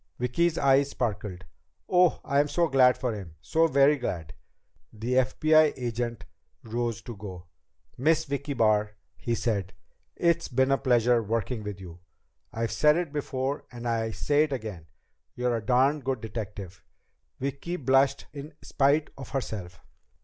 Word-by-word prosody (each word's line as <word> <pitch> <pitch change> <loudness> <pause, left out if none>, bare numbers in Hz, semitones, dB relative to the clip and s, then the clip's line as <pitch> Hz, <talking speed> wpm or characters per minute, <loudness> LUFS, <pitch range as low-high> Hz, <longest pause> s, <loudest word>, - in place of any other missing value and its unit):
Vicki's 155 +7 +1
eyes 140 0 +4
sparkled. 100 -7 -3 0.4
"Oh, 180 -1 +3
I'm 140 +1 +2
so 170 +3 +1
glad 130 -3 +5
for 125 -3 -2
him. 95 -7 -8
So 160 - +2
very 140 0 +4
glad!" 85 - -4 0.6
The 115 +3 -3
FBI 155 +4 +4
agent 120 -1 -3 0.4
rose 115 0 -3
to 120 - -7
go. 95 -3 -9 0.5
"Miss 160 +4 +2
Vicki 140 0 -3
Barr," 105 -2 +2 0.2
he 120 - -2
said, 100 -6 -2 0.4
"it's 170 -1 +1
been 130 +1 +1
a 135 - +3
pleasure 120 -2 +3
working 115 +2 -2
with 105 -2 -6
you. 90 -2 -10 0.5
I've 115 0 -2
said 150 +1 +4
it 170 -4 -3
before 135 -1 -3
and 120 -1 -6
I 115 -1 0
say 145 +6 +1
it 155 -1 +1
again 105 -10 -6 0.5
you're 125 -1 0
a - - -4
darn 130 +6 +3
good 135 -3 -2
detective." 105 -4 -7 0.6
Vicki 140 +6 -3
blushed 135 -2 +2
in 145 +1 -8
spite 145 +2 +2
of 135 - -8
herself. 100 -10 -5
125 Hz, 150 wpm, -27 LUFS, 110-140 Hz, 0.6 s, glad